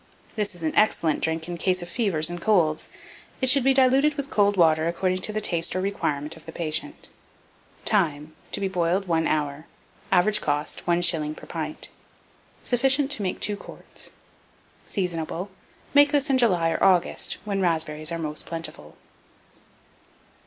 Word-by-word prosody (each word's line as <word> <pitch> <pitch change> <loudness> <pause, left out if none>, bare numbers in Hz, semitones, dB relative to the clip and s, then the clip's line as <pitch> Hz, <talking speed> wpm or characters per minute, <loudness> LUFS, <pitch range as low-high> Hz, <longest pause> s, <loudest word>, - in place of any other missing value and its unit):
This 210 -4 -2
is 170 - -7
an 155 - -1
excellent 165 -7 +2
drink 160 0 -1
in 175 -1 -5
cases 185 0 0
of 175 - -8
fevers 170 -6 +1
and 175 0 -5
colds: 170 -8 +2 0.5
it 260 -1 +4
should 275 -1 +4
be 270 - +4
diluted 270 +3 +4
with 280 -1 -5
cold 205 -1 +2
water, 160 -2 +4
according 185 +2 0
to 200 - +1
the 215 - -2
taste 170 -5 -1
or - - 0
requirement 155 -6 -2
of 160 - -15
the - - -6
patient. 165 - -3 0.8
Time. 155 -7 +1 0.2
To - - -1
be 195 - 0
boiled 185 +1 0
1 165 -1 +1
hour. 150 0 -2 0.4
Average 210 +4 +3
cost, 145 +3 -2
1s. 170 -3 +2
per - - -11
pint. - - -5 0.7
Sufficient 270 +3 +2
to 260 - +1
make 185 -2 -2
2 205 - 0
quarts. - - -8 0.8
Seasonable. 180 0 -3 0.4
Make 285 0 +6
this 290 -1 +1
in 260 - +3
July 180 -9 +3
or - - -1
August, 185 -3 +2
when 200 -2 -1
raspberries 160 -2 -1
are 170 - -2
most 155 -2 -3
plentiful. 165 - -5
175 Hz, 160 wpm, -25 LUFS, 160-210 Hz, 0.8 s, Make